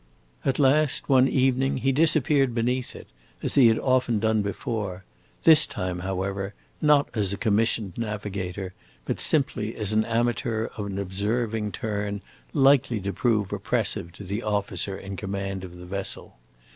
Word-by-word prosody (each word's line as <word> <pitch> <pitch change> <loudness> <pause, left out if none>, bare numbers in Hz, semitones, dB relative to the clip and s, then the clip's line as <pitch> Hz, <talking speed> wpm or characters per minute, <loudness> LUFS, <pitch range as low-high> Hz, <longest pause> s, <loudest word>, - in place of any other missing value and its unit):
At 135 - 0
last, 145 +1 +2
one 130 -1 +5
evening, 135 0 +1
he 135 +1 +1
disappeared 145 -3 +3
beneath 125 +2 -1
it, - - -10 0.4
as - - -1
he 130 -4 +6
had 110 -1 +4
often 130 -3 +1
done 110 0 +1
before; 100 -2 -4 0.4
this 160 -2 +7
time, 90 -1 -4
however, 95 +2 -3 0.3
not 150 -2 +4
as 105 -4 0
a - - -4
commissioned 110 -3 +1
navigator, 100 -4 -4 0.3
but - - -2
simply 125 -7 +1
as 105 -1 +2
an 110 0 +3
amateur 115 -1 -1
of 105 -2 -4
an 100 -1 -5
observing 105 +3 -2
turn 105 -2 -3 0.3
likely 135 -5 +3
to 100 +1 -4
prove 105 -1 0
oppressive 85 - -1
to 100 - -10
the 100 +4 -3
officer 100 -2 -2
in 100 0 -7
command 95 -1 -4
of 90 -1 -9
the 90 - -10
vessel. 100 +2 -4
110 Hz, 155 wpm, -25 LUFS, 100-125 Hz, 0.4 s, this